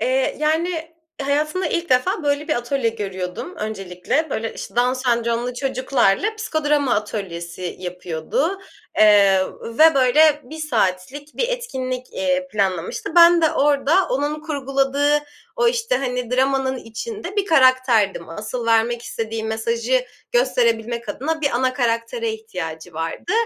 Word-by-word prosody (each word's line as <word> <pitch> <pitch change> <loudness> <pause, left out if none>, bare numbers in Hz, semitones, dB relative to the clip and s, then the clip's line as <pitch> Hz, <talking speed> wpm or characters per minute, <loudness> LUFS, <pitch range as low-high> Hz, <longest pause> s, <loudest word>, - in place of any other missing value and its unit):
Eee, 260 +1 +1
yani, 325 +1 -1 0.3
hayatımda 305 +6 0
ilk 340 0 -2
defa 325 - +2
böyle 290 +2 0
bir 305 - +2
atölye 240 0 0
görüyordum 195 - -5
öncelikle. 215 - -2
Böyle, 225 0 -3
işte, - - -9
Down 245 +1 +3
Sendromlu 240 -1 -1
çocuklarla 265 - +1
psikodrama 300 - 0
atölyesi 180 -4 -4
yapıyordu, 180 - -3 0.4
eee, 200 -3 +6 0.2
ve 310 +8 +4
böyle 295 +3 +4
1 310 +6 -10
saatlik 260 +1 -2
bir - - 0
etkinlik, 260 - -4
eee, 275 -1 -1
planlamıştı. 190 - -1
Ben 340 0 +7
de 320 - +4
orada 285 +1 +2 0.2
onun 290 +3 -1
kurguladığı 280 -1 +1 0.4
o, 475 -1 +3
işte, 475 +1 0
hani, 250 -2 -3
dramanın 265 +1 +1
içinde 375 - -7
bir 405 - +2
karakterdim. 255 - +3
Asıl 215 +7 -5
vermek 230 +1 +2
istediği 225 -1 -4
mesajı 230 +3 0 0.3
gösterebilmek 235 -1 +1
adına 320 +4 -2
bir 285 -2 +1
ana 255 +1 +1
karaktere 240 - -1
ihtiyacı 175 - -7
vardı 165 - -4
255 Hz, 130 wpm, -21 LUFS, 225-305 Hz, 0.4 s, Ben